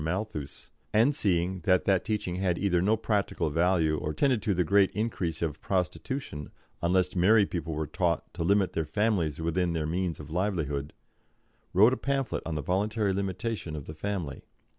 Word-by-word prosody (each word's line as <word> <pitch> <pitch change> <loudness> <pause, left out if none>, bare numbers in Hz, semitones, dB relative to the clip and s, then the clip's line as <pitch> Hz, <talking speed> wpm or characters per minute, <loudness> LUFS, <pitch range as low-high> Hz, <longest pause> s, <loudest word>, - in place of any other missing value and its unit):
Malthus, 80 -4 -4 0.2
and 115 +7 +4
seeing 95 - 0
that 90 +1 +2
that 95 -2 +3
teaching 100 -5 -2
had 90 -2 0
either 90 -3 +1
no 105 +4 +3
practical 100 -7 -1
value 80 -1 +2
or 75 0 -3
tended 130 - +2
to 105 -4 0
the 90 - +2
great 100 +3 +4
increase 95 -7 -2
of 80 -3 -3
prostitution, 90 - -3 0.3
unless 90 +1 +1
married 100 +3 +4
people 85 -3 -3
were 80 +1 -1
taught - - -1
to 85 - -3
limit 100 +2 +2
their 80 - 0
families 85 -3 0
within 85 +2 0
their 80 -2 -1
means 85 +1 -2
of 75 +1 -9
livelihood 80 -6 -1 0.8
wrote 110 +7 +6
a - - -1
pamphlet 135 -2 -1
on 80 - -2
the 75 - -3
voluntary 100 +4 0
limitation 100 -2 -3
of 75 -3 -6
the 80 - -7
family. 80 -5 -4
90 Hz, 175 wpm, -28 LUFS, 80-100 Hz, 0.8 s, wrote